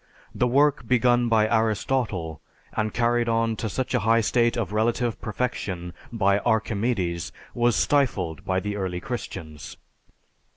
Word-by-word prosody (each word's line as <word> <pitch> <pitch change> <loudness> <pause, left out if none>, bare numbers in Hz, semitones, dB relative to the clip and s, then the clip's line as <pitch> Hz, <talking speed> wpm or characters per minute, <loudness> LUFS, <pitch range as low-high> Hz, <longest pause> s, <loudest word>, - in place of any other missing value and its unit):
The 125 - +1
work 140 -1 +2
begun 120 0 +3
by 110 -1 +4
Aristotle 110 -6 0 0.3
and 110 0 -1
carried 120 0 +1
on 115 0 +1
to 110 - -3
such 130 +5 -3
a 125 - +3
high 115 +2 +3
state 120 +2 +2
of 115 -4 -2
relative 115 +2 0
perfection 100 -6 -3 0.2
by 100 -3 +2
Archimedes, 105 -5 -1 0.2
was 120 -1 +2
stifled 100 - +1
by 95 -1 0
the 105 +1 -3
early 95 -3 -2
Christians. 80 -3 -7
110 Hz, 135 wpm, -25 LUFS, 100-120 Hz, 0.3 s, by